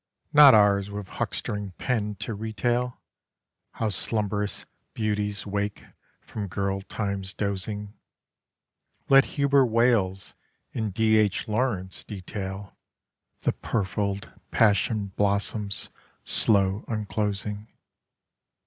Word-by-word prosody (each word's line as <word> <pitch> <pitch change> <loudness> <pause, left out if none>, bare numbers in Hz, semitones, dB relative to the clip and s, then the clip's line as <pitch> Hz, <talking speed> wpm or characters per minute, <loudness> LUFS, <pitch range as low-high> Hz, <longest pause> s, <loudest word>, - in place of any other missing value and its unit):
not 145 -4 +9
ours 100 -1 +4
with 100 -1 -6
huckstering 105 -1 -4
pen 105 -5 -1
to 105 +4 -5
retail 120 +3 -1 0.7
How 110 - -1
slumb'rous 105 -1 -1 0.3
beauties 105 -1 -1
wake 100 0 -3 0.4
from 105 -2 -6
girl 100 +1 -2
time's 100 -2 -4
dozing. 105 +1 -3 1.2
Let 135 -1 +7
Hubert 140 -2 +4
Wales 110 -5 +1 0.4
and 110 -2 -2
D. 110 +2 +3
H. 105 +2 +1
Lawrence 105 -5 -1
detail 95 0 -6 0.7
The - - +1
purfled 100 -1 -2 0.2
passion 105 -1 +2
blossom's 100 0 0 0.3
slow 100 -1 +3
unclosing. 105 -1 -2
105 Hz, 95 wpm, -26 LUFS, 100-110 Hz, 1.2 s, not